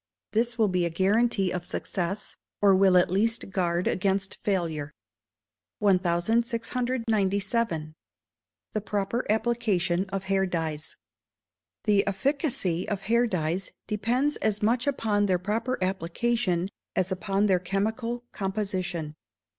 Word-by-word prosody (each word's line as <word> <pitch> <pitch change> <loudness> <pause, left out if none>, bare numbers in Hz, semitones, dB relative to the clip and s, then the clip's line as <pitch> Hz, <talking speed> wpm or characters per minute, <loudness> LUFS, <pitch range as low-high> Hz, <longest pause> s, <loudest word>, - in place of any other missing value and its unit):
This 235 +2 0
will 220 -2 +4
be 180 -2 +1
a 170 - +1
guarantee 195 +2 +2
of 180 -1 -3
success, 190 +2 -3 0.2
or 200 -2 +6
will 190 -1 +5
at 180 - +4
least 215 +1 +1
guard 175 -2 0
against 195 +1 0
failure. 165 -7 -1 0.9
1697. 210 -1 +1 0.8
The 215 - -1
proper 210 +3 -1
Application 210 -6 +1
of 195 -1 -3
Hair 190 0 +1
Dyes. 160 -3 -3 0.9
The 205 -1 +3
efficacy 200 - 0
of 200 -2 -2
hair 235 +4 +2
dyes 180 -1 -1 0.2
depends 240 +8 0
as 210 -1 0
much 240 +5 +2
upon 210 -7 +1
their 185 -2 +3
proper 220 +7 -1
application 190 +1 0 0.3
as 185 0 +1
upon 195 +2 0
their 190 -3 +3
chemical 220 +6 -2
composition. 190 -5 -3
195 Hz, 115 wpm, -27 LUFS, 180-225 Hz, 0.9 s, or